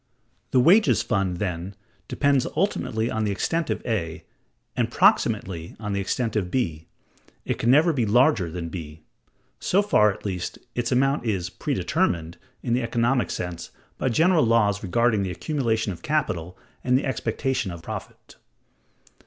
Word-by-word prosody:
The 130 - +3
wages 190 - +5
fund, 100 -6 0
then, 90 0 -4 0.3
depends 140 -2 +2
ultimately 120 - 0
on 110 - -1
the 105 - 0
extent 165 +11 -1
of - - -3
A, 85 -9 -2 0.5
and - - 0
proximately 85 -3 +1
on 105 -2 -3
the 100 - 0
extent 115 +4 -2
of 95 -4 0
B. 85 -10 -2 0.6
It - - -2
can 115 - +1
never 155 +6 +5
be 120 -6 0
larger 120 - +3
than 85 0 -5
B. 80 -2 -8 0.6
So 200 +3 +2
far, 105 - +4
at 95 - -11
least, 90 -3 -3 0.2
its 120 0 -2
amount 135 0 +2
is 90 -5 -1
"predetermined" 85 -2 -1 0.2
in 120 - 0
the 125 - +2
economic 120 +2 +1
sense 90 -1 -5 0.3
by 130 - +1
general 165 +6 +4
laws 110 -3 +2
regarding 110 +3 +2
the 95 - -2
accumulation 110 - -1
of 85 -2 -8
capital 90 - -2 0.3
and 125 0 +3
the 135 - -2
expectation 130 -3 -1
of 85 -2 -8
profit. - - -8
110 Hz, 155 wpm, -24 LUFS, 90-130 Hz, 0.6 s, wages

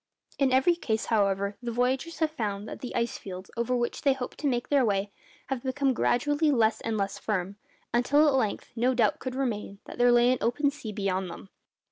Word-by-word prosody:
In 275 -2 +3
every 265 +7 +4
case, 220 -9 -2
however, 200 -1 +1
the 240 - -4
voyagers 255 +7 0
have 315 -1 +1
found 210 -7 -3
that - - -7
the 250 - -6
ice 235 0 -1
fields, 185 -1 -8
over 235 +2 0
which 240 -1 -2
they 275 - +4
hoped 265 -2 -6
to 295 - -1
make 245 -2 -1
their 280 -2 +4
way, 200 -2 0 0.4
have 265 -3 -2
become 265 +1 0
gradually 290 +6 +2
less 230 -5 +2
and 225 -1 -2
less 195 -1 -2
firm, 200 -2 -2 0.4
until 285 +6 +4
at 290 - +3
length 240 -6 -1
no 250 +2 +2
doubt 225 -4 +2
could 255 -1 -5
remain 220 -7 -2
that - - -10
there 245 0 +5
lay 240 +1 +5
an 255 - 0
open 280 +5 +1
sea 285 -7 -7
beyond 190 -3 -2
them. 195 - -10
240 Hz, 210 wpm, -28 LUFS, 210-265 Hz, 0.4 s, there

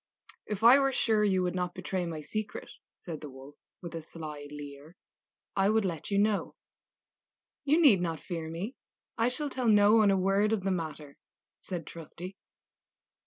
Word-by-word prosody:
"If 210 0 -4
I 245 +4 +9
were 275 -1 +2
sure 220 -4 +2
you 190 -3 +2
would 180 - -1
not 180 -1 -2
betray 185 -1 -3
my 160 -2 -5
secret," 215 +7 -5 0.3
said 165 -4 -7
the 150 - -7
Wolf, 135 +2 -12 0.3
with 170 - -7
a 165 - -4
sly 155 -2 -8
leer, 145 +2 -10 0.6
"I 195 0 +3
would 220 -1 +2
let 165 -5 -4
you 200 - +1
know." 205 0 +1 1.1
"You 300 +4 +4
need 250 - +6
not 165 -3 -2
fear 165 -3 -5
me; 190 +11 -5 0.4
I 230 +2 +3
shall 285 +3 -2
tell 255 -2 -1
no 210 0 +6
one 215 -2 +5
a 195 - +3
word 195 +3 +2
of 205 -4 -1
the 195 - 0
matter," 155 -5 -5 0.4
said 175 -4 -6
Trusty. 170 +4 -9
185 Hz, 175 wpm, -30 LUFS, 160-215 Hz, 1.1 s, I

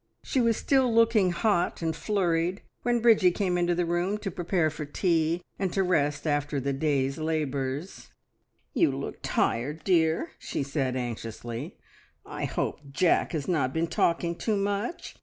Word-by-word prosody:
She 260 - 0
was 230 -2 +2
still 265 -3 +2
looking 225 -4 +4
hot 175 -1 0
and 160 -1 0
flurried 180 -2 0 0.2
when 240 -1 +1
Bridgie 220 -6 +6
came 180 0 -1
into 175 0 +1
the 175 0 +1
room 175 +4 0
to 210 -2 -4
prepare 175 -2 0
for 155 0 -6
tea, 165 +2 0 0.2
and 190 -2 0
to 195 - +2
rest 150 -5 +1
after 145 -1 0
the 140 +1 -1
day's 140 -1 0
labours. 150 0 -3 0.6
"You - - +3
look - - -5
tired, 145 +7 -1
dear!" 165 -3 +2
she - - -3
said 135 -2 -1
anxiously. 115 -1 -5 0.5
"I - - -4
hope - - -2
Jack 170 +6 +2
has 150 -4 -2
not 140 -7 +1
been 165 +1 +2
talking 170 +1 0
too 215 +4 -1
much. 205 - -3
170 Hz, 160 wpm, -27 LUFS, 145-195 Hz, 0.6 s, Bridgie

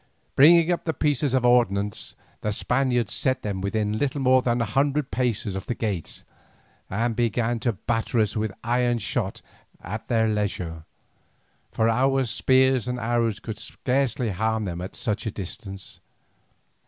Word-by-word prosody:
Bringing 165 +4 +7
up 175 - -1
their 160 - -1
pieces 145 -2 +1
of 125 -2 +2
ordnance, 105 -5 +1 0.3
the 105 - -1
Spaniards 125 +2 0
set 130 -1 0
them 100 -3 -3
within 105 +2 -1
little 145 0 -1
more 130 -1 +4
than 120 -1 0
an 115 - 0
hundred 140 +3 +1
paces 115 -6 -1
of 95 - -5
the 120 - -1
gates, 100 -8 -4 0.7
and 115 +4 -1
began 120 0 0
to 120 0 0
batter 115 +4 -1
us 105 -2 +1
with 110 -1 -1
iron 120 0 +1
shot 105 -2 -3 0.4
at 105 +5 -6
their 115 -2 +2
leisure, 95 -7 -2 0.9
for 110 - +1
our 135 +3 +2
spears 130 +1 +3
and 125 0 -2
arrows 115 -2 0
could 110 0 -6
scarcely 125 +1 -1
harm 110 +3 -1
them 90 -2 -4
at 90 - -7
such 110 +1 -2
a - - -1
distance. 95 0 -7
115 Hz, 155 wpm, -25 LUFS, 105-130 Hz, 0.9 s, Bringing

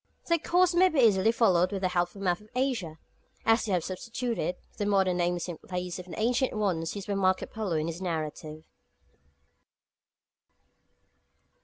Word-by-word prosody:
Their 335 0 +3
course 360 +2 +3
may 370 +2 +5
be 315 - 0
easily 220 -3 +5
followed 185 -6 +3
with 195 -1 -4
the 185 - +2
help 175 -1 +1
of - - -25
a - - -10
map 175 +1 +1
of 210 - -18
Asia, 235 - -1 0.5
as 225 +1 +3
we 200 - 0
have 175 -3 +1
substituted 230 +1 -3 0.2
the 205 - -1
modern 190 -3 +2
names 175 0 0
in 175 -3 -6
place 180 -1 -5
of 180 - -9
the 180 - -7
ancient 245 +4 +1
ones 180 -6 -1
used 200 -1 -6
by 205 - -1
Marco 190 -1 +1
Polo 210 -6 -3
in 155 0 0
his 170 +2 -5
narrative. 155 -2 -4
190 Hz, 175 wpm, -28 LUFS, 175-225 Hz, 0.5 s, may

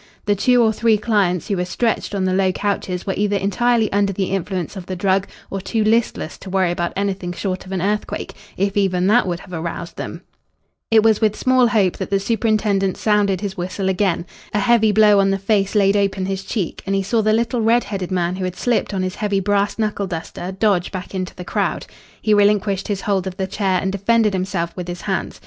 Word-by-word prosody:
The 205 - +3
two 245 +4 +4
or 220 -1 +3
three 225 0 +3
clients 200 -6 +1
who 200 - -1
were 180 - 0
stretched 215 +3 -1
on 195 - 0
the 185 - +1
low 190 0 +2
couches 190 -2 -2
were 195 - -1
either 205 0 0
entirely 220 +3 +1
under 200 0 +2
the 190 -1 -2
influence 190 -1 -3
of 185 -2 -8
the 185 - -3
drug 190 +1 +1 0.2
or 195 - -3
too 215 +3 -1
listless 220 -6 0
to 195 - -9
worry 185 -2 +1
about 175 0 -2
anything 190 -3 -2
short 185 0 -4
of - - -9
an 185 -2 -2
earthquake 210 +1 -2 0.2
if 195 +1 0
even 185 -3 +1
that 215 +2 +4
would 175 -1 -3
have 185 - -13
aroused 170 +1 -5
them. - - -6 0.7
It 220 -1 +5
was 220 -1 +3
with 215 -1 +2
small 255 -1 +3
hope 205 -6 +2
that - - -4
the 195 - +2
superintendent 210 -2 +1
sounded 205 -3 +1
his 200 -1 -4
whistle 185 +2 -2
again. 185 -2 0 0.3
A - - +3
heavy 220 0 +4
blow 210 -1 +5
on 195 0 +3
the 195 - +1
face 195 0 0
laid 200 -1 +4
open 195 -2 0
his 195 0 -3
cheek, 190 -3 -3
and 195 - +1
he 195 - +1
saw 225 +4 +1
the 215 0 +2
little 230 +2 +1
red 230 +2 +3
headed 190 -4 -4
man 180 -1 -1
who 190 - -3
had 185 -1 -3
slipped 235 -3 0
on 185 - -1
his 185 0 -2
heavy 205 -1 -1
brass 200 +1 0
knuckle 210 -3 -1
duster 175 +1 -5
dodge 190 -2 +1
back 185 0 -6
into 185 -1 -4
the 180 - -8
crowd. - - -1 0.3
He 215 - +2
relinquished 205 -1 +2
his 200 -2 -2
hold 195 -2 0
of 185 0 -6
the 190 - -1
chair 190 -1 0
and 190 - -1
defended 210 +2 +2
himself 185 -3 -2
with 180 -2 -6
his 175 0 -6
hands. - - -3
195 Hz, 225 wpm, -20 LUFS, 185-210 Hz, 0.7 s, It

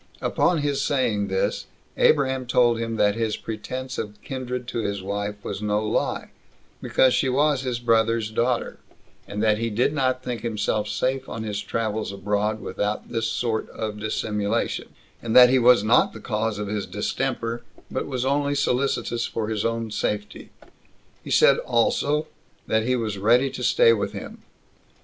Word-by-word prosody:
Upon 170 -4 +1
his 140 -1 0
saying 120 -8 0
this, 95 0 -1 0.3
Abraham 130 -3 +2
told 120 -1 +3
him 115 0 -2
that 105 -2 +3
his 110 -1 -1
pretense 130 +4 -5
of 105 -1 -6
kindred 125 -2 -5
to 120 - -3
his 100 -3 -2
wife 100 +1 -3
was - - -5
no 105 0 0
lie, - - -1 0.5
because 130 -1 +3
she 135 - +2
was 145 +1 +2
his 125 -3 -2
brother's 115 -2 +1
daughter; 120 +2 -1 0.5
and 105 +1 -3
that 110 -1 +3
he 115 0 -1
did 120 +7 +1
not 130 -3 0
think 125 -2 -4
himself 105 -2 -1
safe 130 +5 -1
in 115 - -5
his 105 -2 -3
travels 110 0 -2
abroad, 105 +2 -1
without 105 +1 -3
this 115 -1 -1
sort 115 -1 -2
of 110 -1 -5
dissimulation; 105 0 -2 0.3
and 115 -1 -2
that 125 0 +9
he 130 - +4
was 120 -3 +6
not 115 +3 +4
the 110 - -9
cause 110 -1 -2
of 105 0 -4
his 105 -1 -3
distemper, 115 +4 -2 0.3
but - - -2
was 130 -2 -2
only 140 +1 +1
solicitous 125 -3 0
for 110 -1 -3
his 110 -2 -1
own 115 -1 -2
safety: 105 0 -3 0.7
he - - -9
said - - +5
also, 145 +6 +1 0.4
that 110 +1 +1
he 125 - +2
was 110 -5 -2
ready 120 +6 +3
to - - -7
stay 470 -2 +5
with - - -2
him. - - -8
115 Hz, 170 wpm, -24 LUFS, 105-130 Hz, 0.7 s, that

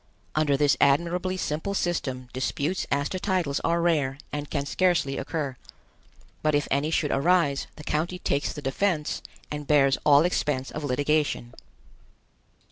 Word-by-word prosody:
Under 150 -2 +2
this 145 -1 +4
admirably 175 +6 +2
simple 170 +4 -2
system 130 -9 -2
disputes 140 +7 -1
as 145 +1 +1
to 185 - -3
titles 180 -8 0
are 170 0 +1
rare 145 -6 +1 0.2
and 145 0 -4
can 140 -2 -2
scarcely 175 -4 +1
occur; 145 -6 -3 0.9
but 155 -1 +2
if 145 - +1
any 140 +3 +1
should 155 -2 0
arise, 145 -1 +2
the 150 - -11
county 160 +5 -1
takes 140 -5 -1
the 150 - -8
defense 150 +3 0 0.3
and 150 -1 -5
bears 140 -2 +4
all 145 +2 +6
expense 145 -6 -1
of 155 - -5
litigation. 145 -2 0
150 Hz, 145 wpm, -26 LUFS, 140-170 Hz, 0.9 s, all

